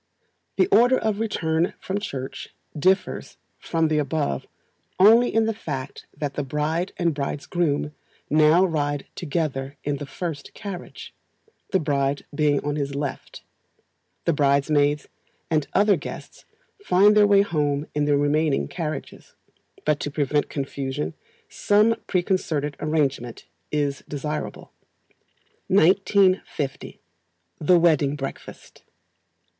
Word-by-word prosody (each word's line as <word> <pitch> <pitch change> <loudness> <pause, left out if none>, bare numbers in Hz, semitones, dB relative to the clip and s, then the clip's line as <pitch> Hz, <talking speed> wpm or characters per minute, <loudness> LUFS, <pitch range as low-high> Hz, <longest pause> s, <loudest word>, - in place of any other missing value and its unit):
The - - +5
order 250 - +5
of 215 -2 -1
return 170 -6 0
from 195 +2 -3
Church 135 -10 -6 0.3
differs 185 +6 0 0.2
from 165 -1 0
the 155 -1 +1
above 145 - -2 0.5
only 225 +5 +6
in 225 0 +2
the 225 - 0
fact 140 -11 -6
that 145 -1 -3
the 145 - -2
bride 150 +6 -1
and 170 -2 +1
bridegroom 145 +1 -2 0.3
now 155 +4 +5
ride 145 -4 -1
together 145 -4 -3
in 145 -1 -1
the 145 0 -7
first 155 -1 -6
carriage, 195 -4 -8 0.6
the 190 - +2
bride 140 -2 -1
being 145 -1 +1
on 145 0 -1
his 140 -1 -3
left. 140 -1 -5 0.8
The 170 - +3
bridesmaids 145 0 +2 0.4
and 155 -3 +1
other 205 -1 +4
guests 145 - -9 0.4
find 205 - +5
their 210 -1 +6
way 200 -1 +5
home 150 -5 -1
in 150 0 0
the 145 -1 +3
remaining 145 +1 +1
carriages, 155 -4 -6 0.5
but 150 -1 +2
to - - -3
prevent 145 0 0
confusion 135 - -3 0.3
some 210 +2 +3
preconcerted 170 -6 0
arrangement 140 -6 -1 0.3
is 145 -2 -1
desirable. 150 +1 -5 1.0
1950. 190 -5 +2 0.6
The 175 +4 +4
Wedding 150 -4 +3
Breakfast. 135 -2 -8
150 Hz, 120 wpm, -24 LUFS, 145-180 Hz, 1.0 s, only